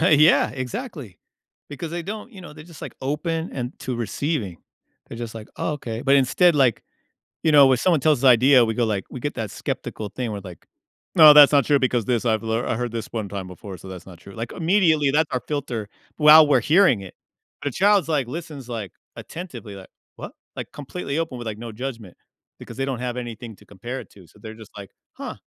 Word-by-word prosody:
Oh, 170 - +3
yeah, 155 +1 +5
exactly. 130 - -7 0.5
Because 145 +3 -7
they 170 +1 -4
don't, 215 +6 -7
you 195 - -11
know, 175 - -11
they're 150 - -12
just, 165 -3 -14
like, - - -7
open 160 +4 -3
and 125 -1 -4
to 130 - -4
receiving. 115 - -3 0.5
They're 115 - -9
just, 115 -2 -6
like, 110 -1 -9
"Oh, - - -2
okay." 120 -6 -6
But 140 0 +3
instead, 155 +6 +3
like 130 -6 +2 0.6
you 160 - +3
know, 145 -2 +8
when 130 -1 +3
someone 170 +3 +2
tells 150 -3 +2
us 135 - +6
idea, 125 +1 +6
we 110 - -2
go, 120 +1 0
like 100 -4 -2
we 130 - -7
get 145 +4 -3
that 110 -3 -4
skeptical 110 - -5
thing 120 +2 -4
where, 105 - -5
like, 90 -4 -12 0.5
"No, 155 -2 +10
that's 145 -1 +9
not 140 -4 +4
true 145 -2 +3
because 125 -4 0
this 120 -3 0
I've 110 -2 +1
lear 115 +1 -1
I - - -1
heard 120 0 -4
this 115 -2 -4
one 110 -3 -4
time 100 -1 -6
before, 95 +2 -9
so 95 - -12
that's 90 -1 -9
not 90 -3 -13
true." 100 - -13
Like, 115 +1 -6
immediately 165 -5 +2
that's 155 +1 +1
our 125 - -1
filter 125 -8 -4 0.3
while 150 0 +8
we're 145 - +3
hearing 160 - +4
it. 95 - -10 0.5
The 145 - -2
child’s, 200 - +3
like, 145 -6 0
listens, 150 -4 -8
like, 110 -6 -6 0.2
attentively, 125 - -9
like, 95 -1 -12 0.3
“What?” - - -8 0.2
Like, - - -7
completely 145 +1 -5
open 160 -6 -3
with, 120 -1 -7
like, 105 -1 -5
no 115 0 -8
judgment 115 -5 -7 0.4
because - - -11
they 135 - -1
don't 135 -3 -3
have 125 0 -4
anything 120 -3 -7
to - - -20
compare 120 +7 -7
it - - -12
to, 95 -4 -17
so 95 - -22
they're 110 +1 -9
just, 110 -1 -14
like, 100 -2 -10 0.2
"Huh." - - -7
130 Hz, 225 wpm, -23 LUFS, 110-150 Hz, 0.6 s, No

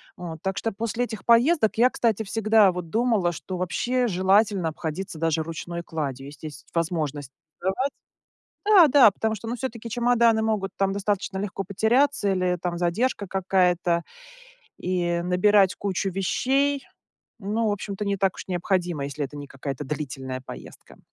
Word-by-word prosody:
вот. 165 -3 -8
Так 190 0 -2
что 225 - -1
после 225 +3 -2
этих 225 -3 -6
поездок 235 +1 +4
я, 245 +3 +5
кстати, 225 -4 0
всегда 215 -1 +4
вот 180 -2 -6
думала, 220 -5 +1
что 185 +3 -6
вообще 245 +8 0
желательно 190 -1 +2
обходиться 160 +2 -5
даже 165 -1 +1
ручной 170 +1 -6
кладью, 140 -5 -4
если 145 +2 -9
есть 145 -2 -11
возможность 155 -5 -2 0.3
сдавать. 220 +10 -1 0.7
Да, 400 -6 +7
да, 270 -6 +7
потому 220 +2 -2
что, 225 - -9
ну, 240 - -2
всё-таки 230 -2 -5
чемоданы 235 -1 +3
могут 215 -3 -1
там 195 0 +1
достаточно 200 -1 -2
легко 195 0 -3
потеряться 220 +3 +2
или 180 -1 0
там 175 -1 -2
задержка 200 +5 0
какая-то, 180 -2 +1 0.8
и 175 -1 -1
набирать 190 +2 +4
кучу 195 -1 -2
вещей, 270 +9 0 0.6
ну, 220 +2 -1
в - - +2
общем-то, 205 0 -4
не 200 0 0
так 190 -1 +1
уж - - -9
необходимо, 175 -4 -1
если 145 +1 -3
это 145 - -11
не 145 -1 -7
какая-то 135 +1 -6
длительная 135 -3 -5
поездка. - - -11
190 Hz, 155 wpm, -25 LUFS, 170-220 Hz, 0.8 s, Да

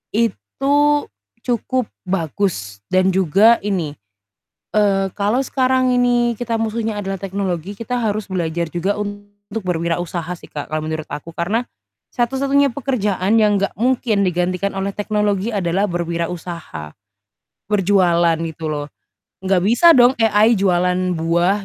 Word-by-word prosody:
itu 235 +5 -1 0.7
cukup 250 0 0 0.2
bagus 165 - -2
dan 185 0 +3
juga 195 +5 +5
ini, 180 -8 -1 0.8
eee, 200 -2 +3
kalau 210 +5 +1
sekarang 255 -1 +2
ini 245 -1 +2
kita 230 0 -2
musuhnya 225 -1 -2
adalah 195 -1 -3
teknologi, 190 -2 -3
kita 230 +3 -3
harus 215 -2 -1
belajar 170 -3 -2
juga 190 +4 -1
untuk 205 +1 -7
berwirausaha 170 -1 -2
sih, - - -14
Kak, 145 - -5
kalau 155 0 -2
menurut 155 -1 -4
aku. 150 +3 -7
Karena 200 +8 -1 0.5
satu-satunya 275 +3 +2
pekerjaan 215 -6 0
yang 210 -1 +3
enggak 200 - 0
mungkin 235 -3 +1
digantikan 180 +2 -1
oleh 195 +1 -1
teknologi 210 0 0
adalah 190 0 +1
berwirausaha, 170 - -4 0.8
berjualan 175 -4 +3
gitu 160 0 -7
loh. 145 -1 -3 0.6
Enggak 190 -1 +2
bisa 245 - +6
dong 245 +1 +6
AI 220 +1 +4
jualan 180 -1 +1
buah, 175 +5 +1
195 Hz, 125 wpm, -19 LUFS, 175-225 Hz, 0.8 s, bisa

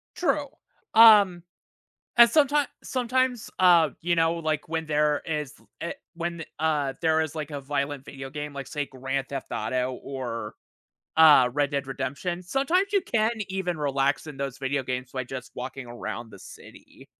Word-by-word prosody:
True, 300 -5 0 0.5
um, 205 -6 +7 0.7
and 235 0 +9
someti 290 -1 +3 0.2
sometimes, 255 -1 0
uh, 170 -5 +6
you 175 +1 0
know, 165 0 +3
like 155 -2 -2
when 160 -1 -2
there 150 0 +1
is, 150 -3 -3
l - - -24
i - - -3
uh, - - -2 0.2
when, 170 -1 -4
uh, 150 -4 0
there 160 -1 +3
is 160 -1 -2
like 155 -1 -5
a 145 -1 -5
violent 140 0 -3
video 135 -1 -8
game, 150 0 -5
like 140 -1 -6
say 145 -2 -3
Grand 135 +1 -4
Theft 135 -1 -5
Auto 125 +4 -1
or, 120 -5 -5 0.6
uh, 150 -6 +8
Red 145 0 +1
Dead 140 -1 -2
Redemption, 175 +7 -3
sometimes 345 - 0
you 400 - +4
can 225 -6 +1 0.2
even 185 -3 -2
relax 140 +1 0
in 145 -2 -8
those 135 -2 -4
video 135 0 -1
games 125 0 -4
by 130 -1 -3
just 125 -1 -8
walking 130 0 -6
around 120 -1 -6
the 100 - -13
city. - - -14
150 Hz, 170 wpm, -26 LUFS, 135-175 Hz, 0.7 s, and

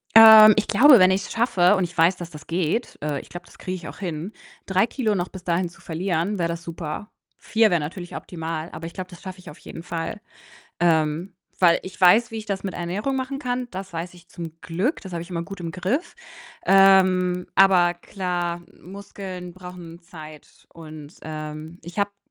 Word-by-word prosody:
Ähm, 220 -1 +10
ich 215 - +1
glaube, 250 +4 +7
wenn 185 0 +6
ich's 195 +1 -1
schaffe, 205 -5 +3
und 190 - +1
ich 175 0 -7
weiß, 170 +3 +4
dass 175 -1 -8
das 150 -1 -12
geht 175 +7 -2
äh, 150 -2 -2
ich - - -13
glaube, 175 0 -10
das - - -19
kriege 185 0 -4
ich 165 -4 -9
auch 140 - -10
hin, 175 0 -5 0.3
3 190 +2 +2
Kilo 225 -5 -1
noch 180 -1 -2
bis 185 -2 -11
dahin 175 +1 0
zu 170 - -19
verlieren, 175 +3 -2
wäre 170 - 0
das 170 0 -5
super. 165 +4 -6 0.3
4 220 -1 +2
wäre 175 -3 +2
natürlich 175 +4 -6
optimal, 165 -1 -5
aber 165 - -7
ich 170 - -8
glaube, 185 0 -7
das 175 +2 -13
schaffe 185 -1 -8
ich 180 - -11
auf 150 - -14
jeden 165 - -10
Fall. 170 +4 -5 0.6
Ähm, 165 +2 +1 0.2
weil 170 -2 +5
ich 185 - -10
weiß, 215 +6 +5
wie 225 - -6
ich 215 - -6
das 200 -2 -3
mit 190 - -4
Ernährung 200 +10 -2
machen 265 +1 -3
kann, 250 -2 -3
das 190 -1 -7
weiß 170 +2 -5
ich 175 -1 -18
zum 165 -1 -9
Glück, 190 - -2
das 190 - -10
habe 170 -1 -3
ich 180 - -13
immer 170 -1 -3
gut 195 +1 -9
im 170 - -4
Griff. 195 - -2 0.5
Ähm, 185 -2 +4
aber 180 -3 +5
klar, 175 -1 -3 0.2
Muskeln 185 -1 -9
brauchen 180 -2 -11
Zeit 155 -3 -13
und, 155 -2 -11
ähm, 155 +2 -7
ich 175 +4 -10
habe, 200 0 +1
hm, 200 - -49
180 Hz, 205 wpm, -23 LUFS, 170-195 Hz, 0.6 s, Ähm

